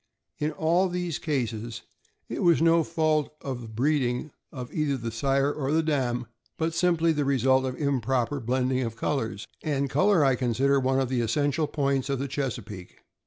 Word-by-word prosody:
In 150 Hz, +1 st, 0 dB
all 175 Hz, +4 st, +2 dB
these 175 Hz, -3 st, -3 dB
cases, 120 Hz, -6 st, -3 dB, 0.4 s
it -, -, -4 dB
was 170 Hz, -2 st, +4 dB
no 165 Hz, 0 st, +4 dB
fault 155 Hz, -2 st, 0 dB
of 130 Hz, -3 st, -4 dB
the 115 Hz, -, -8 dB
breeding 125 Hz, +3 st, 0 dB, 0.2 s
of 125 Hz, -3 st, -7 dB
either 140 Hz, -7 st, -1 dB
sire 135 Hz, +4 st, +1 dB
or 150 Hz, +2 st, 0 dB
dam, 125 Hz, -5 st, 0 dB, 0.3 s
but 160 Hz, 0 st, -1 dB
simply 170 Hz, -1 st, +2 dB
the 150 Hz, -2 st, 0 dB
result 130 Hz, -1 st, +3 dB
of 130 Hz, -1 st, -3 dB
improper 135 Hz, -2 st, 0 dB
blending 130 Hz, +2 st, 0 dB
of 115 Hz, -3 st, -3 dB
colors; 115 Hz, -6 st, -2 dB
and 140 Hz, -3 st, -1 dB
color 190 Hz, -6 st, +4 dB
I 135 Hz, -, +4 dB
consider 130 Hz, +3 st, +2 dB
one 130 Hz, 0 st, +1 dB
of 130 Hz, -2 st, 0 dB
the 130 Hz, -2 st, 0 dB
essential 145 Hz, +6 st, +1 dB
points 140 Hz, -2 st, 0 dB
in 135 Hz, -, 0 dB
the 140 Hz, +2 st, -3 dB
Chesapeake. 125 Hz, -9 st, -5 dB
135 Hz, 165 wpm, -27 LUFS, 125-155 Hz, 0.4 s, was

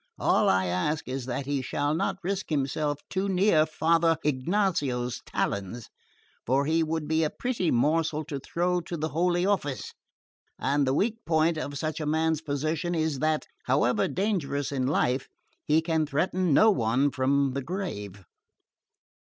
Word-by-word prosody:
All -, -, +3 dB
I 95 Hz, 0 st, +3 dB
ask 90 Hz, -, -1 dB
is 130 Hz, 0 st, -4 dB
that 130 Hz, +2 st, -3 dB
he 140 Hz, -1 st, -1 dB
shall 145 Hz, +3 st, -1 dB
not 190 Hz, +5 st, -1 dB
risk 190 Hz, +1 st, -2 dB
himself 145 Hz, 0 st, -1 dB
too 195 Hz, +1 st, -2 dB
near 180 Hz, -4 st, +3 dB
Father 165 Hz, +1 st, +2 dB
Ignazio's 140 Hz, -, 0 dB
talons, 100 Hz, +4 st, -3 dB, 0.5 s
for 135 Hz, +3 st, +1 dB
he 160 Hz, +2 st, +2 dB
would 160 Hz, -1 st, -2 dB
be 160 Hz, +1 st, +2 dB
a 155 Hz, -, +1 dB
pretty 235 Hz, -7 st, -2 dB
morsel 155 Hz, +4 st, +1 dB
to 145 Hz, -2 st, -5 dB
throw 180 Hz, +5 st, -1 dB
to 170 Hz, 0 st, -6 dB
the 155 Hz, +1 st, -2 dB
Holy 175 Hz, +3 st, +1 dB
Office, 180 Hz, -9 st, -1 dB, 0.6 s
and 140 Hz, 0 st, +1 dB
the 130 Hz, -, +2 dB
weak 225 Hz, +6 st, 0 dB
point 160 Hz, 0 st, +2 dB
of 145 Hz, -2 st, -4 dB
such 155 Hz, +2 st, -3 dB
a 155 Hz, -, -3 dB
man's 160 Hz, 0 st, +1 dB
position 155 Hz, +3 st, -2 dB
is 155 Hz, -4 st, 0 dB
that, 155 Hz, +1 st, 0 dB, 0.2 s
however 125 Hz, -1 st, +2 dB
dangerous 175 Hz, -9 st, -1 dB
in 130 Hz, -2 st, -1 dB
life, 135 Hz, -2 st, +1 dB, 0.4 s
he 155 Hz, +2 st, +3 dB
can 160 Hz, -2 st, 0 dB
threaten 175 Hz, +4 st, 0 dB
no 215 Hz, +10 st, +6 dB
one 130 Hz, -, +1 dB
from 135 Hz, +1 st, +1 dB
the 140 Hz, -, -2 dB
grave." 105 Hz, -, -5 dB
155 Hz, 160 wpm, -27 LUFS, 135-170 Hz, 0.6 s, no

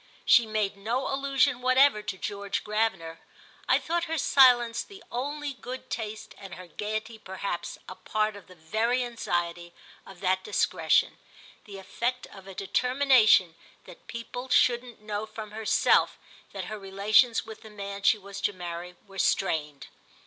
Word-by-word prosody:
She 235 Hz, -2 st, +6 dB
made 215 Hz, -2 st, -1 dB
no 235 Hz, +7 st, -2 dB
allusion 270 Hz, -2 st, +1 dB
whatever 255 Hz, -2 st, +4 dB
to 190 Hz, -, -5 dB
George 200 Hz, +1 st, -4 dB
Gravener—I 210 Hz, -7 st, -2 dB
thought 340 Hz, +1 st, -1 dB
her 325 Hz, 0 st, -2 dB
silence 245 Hz, -5 st, +5 dB
the 395 Hz, -1 st, -12 dB
only 285 Hz, +4 st, -3 dB
good 255 Hz, 0 st, -9 dB
taste 220 Hz, -2 st, -5 dB
and 195 Hz, -3 st, -9 dB
her 185 Hz, -, -10 dB
gaiety 215 Hz, +4 st, -5 dB
perhaps 190 Hz, -3 st, -5 dB
a -, -, -7 dB
part 215 Hz, +2 st, -1 dB
of 200 Hz, -, -13 dB
the 185 Hz, -, -15 dB
very 220 Hz, +10 st, 0 dB
anxiety 175 Hz, -7 st, -3 dB, 0.3 s
of 190 Hz, -2 st, -13 dB
that 185 Hz, 0 st, +1 dB
discretion, -, -, +1 dB, 0.5 s
the 200 Hz, -2 st, -9 dB
effect 240 Hz, +6 st, -3 dB
of 195 Hz, -1 st, -13 dB
a 195 Hz, -, -10 dB
determination 250 Hz, -4 st, +4 dB, 0.3 s
that -, -, -15 dB
people 235 Hz, +2 st, -7 dB
shouldn't 245 Hz, -2 st, +2 dB
know 210 Hz, 0 st, -4 dB
from 215 Hz, -1 st, -8 dB
herself 220 Hz, 0 st, +2 dB, 0.3 s
that 195 Hz, -2 st, -5 dB
her 215 Hz, +3 st, -6 dB
relations 205 Hz, +5 st, +3 dB
with 220 Hz, -1 st, -10 dB
the 220 Hz, -, -12 dB
man 200 Hz, -1 st, -7 dB
she 200 Hz, +2 st, +4 dB
was 200 Hz, 0 st, -9 dB
to 205 Hz, -, 0 dB
marry 175 Hz, 0 st, -7 dB
were 195 Hz, -1 st, -10 dB
strained. 150 Hz, -7 st, 0 dB
215 Hz, 150 wpm, -27 LUFS, 195-245 Hz, 0.5 s, She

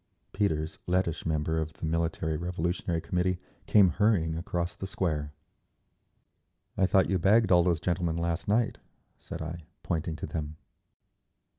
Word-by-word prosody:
Peters, 80 Hz, -6 st, -1 dB
Lettish 90 Hz, -2 st, 0 dB
member 80 Hz, 0 st, 0 dB
of 80 Hz, 0 st, -3 dB
the -, -, -6 dB
Military 80 Hz, -1 st, 0 dB
Revolutionary 85 Hz, 0 st, -2 dB
Committee, 90 Hz, +1 st, 0 dB, 0.3 s
came 100 Hz, -3 st, +6 dB
hurrying 85 Hz, -3 st, +2 dB
across 85 Hz, 0 st, -2 dB
the 95 Hz, -, -5 dB
Square. 80 Hz, -8 st, -1 dB, 1.4 s
"I 95 Hz, -, +3 dB
thought 95 Hz, -1 st, +4 dB
you 95 Hz, -, +1 dB
bagged 105 Hz, +5 st, +4 dB
all 90 Hz, -1 st, +7 dB
those 85 Hz, -2 st, +2 dB
gentlemen 85 Hz, -1 st, 0 dB
last 85 Hz, +4 st, -1 dB
night," 110 Hz, +3 st, +1 dB, 0.4 s
said -, -, -6 dB
I, 80 Hz, +1 st, -5 dB, 0.2 s
pointing 80 Hz, -1 st, -2 dB
to 75 Hz, -, -5 dB
them. 75 Hz, -1 st, -5 dB
85 Hz, 140 wpm, -29 LUFS, 80-95 Hz, 1.4 s, all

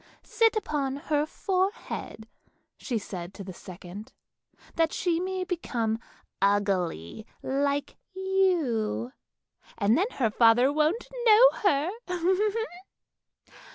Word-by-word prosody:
Sit 450 Hz, +1 st, +2 dB
upon 285 Hz, -10 st, -1 dB
her 295 Hz, +1 st, -1 dB
forehead," 375 Hz, -, -3 dB, 0.5 s
she 245 Hz, -, -3 dB
said 185 Hz, -3 st, -7 dB
to 200 Hz, -, -7 dB
the 185 Hz, -1 st, -8 dB
second, 185 Hz, +4 st, -10 dB, 0.3 s
" -, -, -27 dB
that 325 Hz, -1 st, +2 dB
she 340 Hz, -2 st, 0 dB
may 370 Hz, +1 st, -2 dB
become 235 Hz, -11 st, -2 dB, 0.4 s
ugly 195 Hz, -, 0 dB, 0.2 s
like 280 Hz, +1 st, -1 dB, 0.2 s
you, 345 Hz, -, 0 dB, 0.7 s
and 210 Hz, +2 st, +3 dB
then 385 Hz, +8 st, +1 dB
her 230 Hz, -5 st, 0 dB
father 240 Hz, +5 st, +5 dB
won't 310 Hz, +10 st, +1 dB, 0.2 s
know 450 Hz, +3 st, +8 dB
her! 330 Hz, -4 st, +1 dB
280 Hz, 105 wpm, -27 LUFS, -, 0.7 s, know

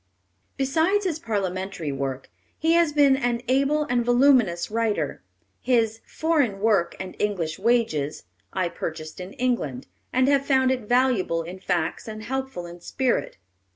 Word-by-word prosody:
Besides 320 Hz, +9 st, +1 dB
his 325 Hz, -4 st, -1 dB
parliamentary 190 Hz, -, -3 dB
work, 135 Hz, -1 st, -4 dB, 0.3 s
he 325 Hz, +1 st, +2 dB
has 340 Hz, -2 st, +4 dB
been 285 Hz, -2 st, +5 dB
an 245 Hz, -3 st, -1 dB
able 275 Hz, +4 st, +2 dB
and 245 Hz, -5 st, 0 dB
voluminous 245 Hz, -8 st, +3 dB
writer. 215 Hz, -10 st, -1 dB, 0.4 s
His 225 Hz, -3 st, +1 dB
Foreign 290 Hz, -11 st, 0 dB
Work 205 Hz, -5 st, +2 dB
and 185 Hz, -1 st, -6 dB
English 180 Hz, -6 st, -1 dB
Wages 195 Hz, -10 st, +1 dB, 0.3 s
I 185 Hz, -2 st, 0 dB
purchased 160 Hz, -1 st, -6 dB
in 180 Hz, +2 st, -7 dB
England, 235 Hz, -, -1 dB, 0.3 s
and 255 Hz, +1 st, +3 dB
have 280 Hz, -1 st, +3 dB
found 260 Hz, -2 st, +3 dB
it 250 Hz, -5 st, -3 dB
valuable 245 Hz, -10 st, +2 dB
in 180 Hz, +3 st, -8 dB
facts 175 Hz, -1 st, -2 dB
and 215 Hz, 0 st, -7 dB
helpful 265 Hz, -8 st, -4 dB
in 175 Hz, 0 st, -10 dB
spirit. 260 Hz, +6 st, -1 dB
230 Hz, 145 wpm, -25 LUFS, 180-265 Hz, 0.4 s, been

